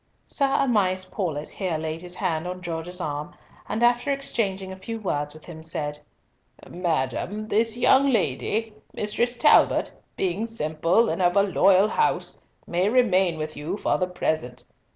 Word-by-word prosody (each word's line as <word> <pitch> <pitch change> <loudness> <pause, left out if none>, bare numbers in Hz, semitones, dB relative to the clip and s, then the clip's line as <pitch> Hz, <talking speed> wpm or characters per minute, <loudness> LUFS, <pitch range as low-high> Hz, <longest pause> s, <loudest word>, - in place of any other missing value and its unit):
Sir 275 - +1
Amias 205 -9 +1
Paulett 155 -7 -3
here 185 -5 -2
laid 160 +1 -4
his 180 0 -7
hand 175 -4 -1
on 180 0 -5
Gorges' 170 +1 -5
arm, 150 -3 -4 0.3
and 220 +2 -1
after 240 +3 +3
exchanging 200 -9 -2
a - - -6
few 205 +5 -6
words 145 -7 -2
with 155 - -14
him, 160 -2 -10
said— 150 -2 -4 0.7
"Madam, 175 - -2
this 225 +2 +1
young 265 +3 +5
lady, 220 - 0 0.2
Mistress 240 +4 -1
Talbot, 295 - +4 0.2
being 195 +4 -1
simple, 165 +1 +1
and - - -1
of 175 0 +3
a 200 - +5
loyal 195 +1 +4
house, 455 - 0 0.3
may 180 +3 +1
remain 190 -8 +3
with 155 0 -5
you 155 +7 -4
for - - 0
the 185 - +1
present. 155 -8 -2
185 Hz, 155 wpm, -25 LUFS, 160-220 Hz, 0.7 s, young